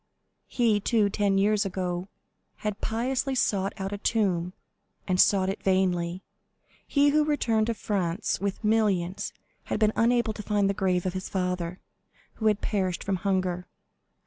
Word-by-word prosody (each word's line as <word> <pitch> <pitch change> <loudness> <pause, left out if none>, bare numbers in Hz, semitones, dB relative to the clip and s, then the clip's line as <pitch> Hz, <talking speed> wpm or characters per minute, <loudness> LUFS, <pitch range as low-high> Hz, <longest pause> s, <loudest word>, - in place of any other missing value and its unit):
He, 225 -4 +2
too, 210 -1 +2
ten 200 -1 +1
years 210 +1 +3
ago, 180 -2 -3 0.6
had 210 -1 -2
piously 260 +4 -1
sought 195 -5 +1
out 195 -1 -4
a 205 - -4
tomb, 185 -6 0 0.5
and 185 -1 +4
sought 190 -2 +3
it 195 - -3
vainly. 185 -1 +1 0.6
He, 285 0 +4
who 300 +1 +3
returned 230 -8 +1
to 230 - -1
France 185 -5 -1
with 200 +2 -3
millions, 205 -5 +1 0.3
had - - -2
been 215 -1 +3
unable 235 -1 +2
to 210 - -7
find 205 -1 +1
the 200 - +1
grave 185 -2 0
of 185 - -1
his 185 0 -5
father, 180 -2 -2 0.6
who 220 - +3
had 210 -1 +2
perished 190 -4 -1
from 195 -1 -1
hunger. 185 -2 -1
200 Hz, 155 wpm, -27 LUFS, 185-220 Hz, 0.6 s, and